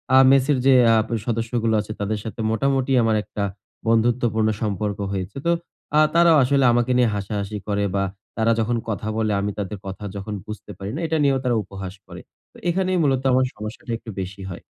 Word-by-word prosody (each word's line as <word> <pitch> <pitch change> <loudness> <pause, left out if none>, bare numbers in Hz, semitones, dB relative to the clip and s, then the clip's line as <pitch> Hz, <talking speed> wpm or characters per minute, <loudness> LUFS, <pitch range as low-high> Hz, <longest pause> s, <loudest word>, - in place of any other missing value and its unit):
আ - - +8
মেসের 135 +1 +4
যে 135 - +7 0.2
আপ 110 - +1 0.2
সদস্যগুলো 115 -1 0
আছে 110 - -8
তাদের 105 +1 -1
সাথে 110 0 -7
মোটামুটি 135 +3 +1
আমার 110 -1 +2
একটা 100 - -4 0.4
বন্ধুত্বপূর্ণ 115 -1 +2
সম্পর্ক 105 -1 -1
হয়েছে। 95 +3 -4
তো 170 - +3 0.5
আ - - +7
তারাও 170 -1 +6
আসলে 135 +1 +3
আমাকে 120 +1 +1
নিয়ে 125 -2 +4
হাসাহাসি 100 +1 -3
করে 100 0 0
বা 100 - +1 0.3
তারা 115 +1 +3
যখন 115 +2 +1
কথা 105 -1 -3
বলে 110 -1 +1
আমি 105 - -1
তাদের 105 +1 -4
কথা 95 +2 -7
যখন 100 +2 -5
বুঝতে 105 -1 -8
পারি 95 - -6
না, 160 - -3
এটা 160 0 0
নিয়েও 135 -1 +3
তারা 125 -2 +1
উপহাস 95 -1 -7
করে। - - -10 0.3
তো - - -15
এখানেই 185 +1 +1
মূলত 135 -2 +2
আমার 130 +1 +4
সমস্যাটা 105 +2 -7
একটু 115 - -12
বেশি 95 +1 -7
হয়। 85 - -8
110 Hz, 190 wpm, -22 LUFS, 105-130 Hz, 0.5 s, আ